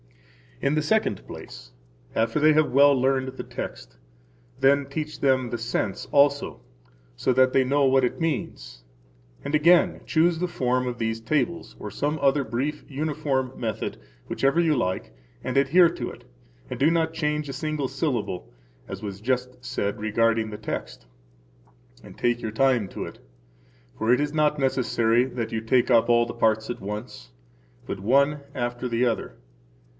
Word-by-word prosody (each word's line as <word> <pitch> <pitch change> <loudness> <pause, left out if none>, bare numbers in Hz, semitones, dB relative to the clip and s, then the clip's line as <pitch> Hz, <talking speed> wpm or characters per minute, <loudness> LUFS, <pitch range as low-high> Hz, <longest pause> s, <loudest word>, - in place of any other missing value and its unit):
In 140 - +2
the 155 - +2
second 155 - 0
place, - - -10 0.4
after 115 +5 +1
they 155 +1 +5
have 155 0 +2
well 140 +2 +6
learned 130 0 +1
the 130 - -7
text, - - -7 0.6
then 140 +1 +4
teach 155 +2 -5
them 130 -3 +2
the 120 - -3
sense 110 -3 -2
also, 140 0 +2 0.5
so 95 - +1
that 130 +1 +4
they 135 - +4
know 140 +2 +2
what 135 0 +4
it 125 - -1
means, - - -3 0.6
and 145 - -1
again 170 +3 +4
choose 165 +1 +2
the 180 - 0
form 125 -6 0
of 120 -1 -3
these 115 0 -1
tables, 155 +8 -2
or 105 - -6
some 145 +8 -1
other 140 0 +3
brief 135 +6 -3
uniform 140 -3 -2
method, 110 -3 -3 0.3
whichever 135 +5 +1
you 165 -3 +3
like, 95 -7 -2 0.3
and 130 - -3
adhere 165 +6 +5
to - - -5
it, - - -12 0.5
and - - -5
do 150 +4 +4
not 165 -1 +1
change 150 -2 -1
a - - -4
single 150 0 -2
syllable, 130 - -3 0.4
as - - -7
was 100 -1 -6
just 125 +1 -2
said 105 -6 -2
regarding 115 +1 +1
the 105 - -6
text; 105 - -6 1.0
and - - -13
take 120 0 +1
your 110 - -3
time 120 -2 +2
to - - -6
it. - - -10 0.8
For 110 +2 +1
it 125 - +4
is 145 0 -1
not 150 -1 +2
necessary 120 -3 +2
that 120 -3 -4
you 110 - -2
take 120 +2 +2
up 115 -1 +4
all 120 0 +4
the - - -6
parts 110 -1 +1
at - - -7
once, 105 - -7 0.6
but 100 - -4
one 140 +8 +2
after 120 0 -3
the 120 +1 +1
other. 120 - -2
130 Hz, 170 wpm, -25 LUFS, 115-145 Hz, 1.0 s, well